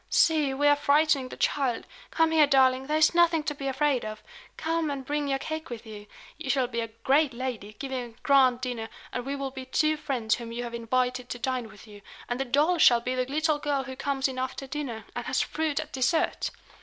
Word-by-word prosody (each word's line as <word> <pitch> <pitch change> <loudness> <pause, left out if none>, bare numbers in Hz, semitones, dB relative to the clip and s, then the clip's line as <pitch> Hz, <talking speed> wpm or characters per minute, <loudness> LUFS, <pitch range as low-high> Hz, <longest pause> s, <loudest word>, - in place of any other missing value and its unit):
See, 305 -4 +3
we 275 +2 -1
are 290 - +6
frightening 290 -2 +2
the - - -9
child! 260 -5 0 0.2
Come 325 -1 +2
here, 310 -2 +5
darling; 265 -1 +3
there 305 +1 +1
is 310 +2 +4
nothing 340 -2 +4
to 295 - -2
be 275 -1 -5
afraid 270 -1 +1
of. 215 0 -7 0.3
Come, 325 -1 -1
and 275 -2 -4
bring 295 0 -1
your 270 -1 +1
cake 315 +3 -5
with 235 -1 -7
you. 210 -1 -10 0.3
You 310 -4 -6
shall 265 -2 +2
be 235 -1 -4
a 230 - -2
great 265 +5 +1
lady, 235 -5 -5
giving 265 -2 -3
a 235 -2 -11
grand 260 -3 +4
dinner; 240 -3 -4 0.2
and 245 +1 -4
we 280 - -2
will 275 -1 -4
be 260 -1 -7
two 310 +4 +1
friends 250 -7 -1
whom 235 -1 -4
you 240 +1 -4
have 235 -1 -6
invited 250 +2 -1
to - - -4
dine 250 -1 -2
with 210 - -14
you; 205 -2 -13 0.3
and 245 +1 -3
the 270 - 0
doll 300 +7 +2
shall 240 -5 +7
be 250 +2 -3
the 255 0 0
little 305 +2 +1
girl 285 -2 -1
who 260 0 -7
comes 275 0 0
in 260 -1 -5
after 260 +1 -4
dinner, 265 -6 -5
and - - -4
has - - +1
fruit 315 -2 -1
at - - -6
dessert!" 265 +5 +1
265 Hz, 230 wpm, -27 LUFS, 245-295 Hz, 0.3 s, shall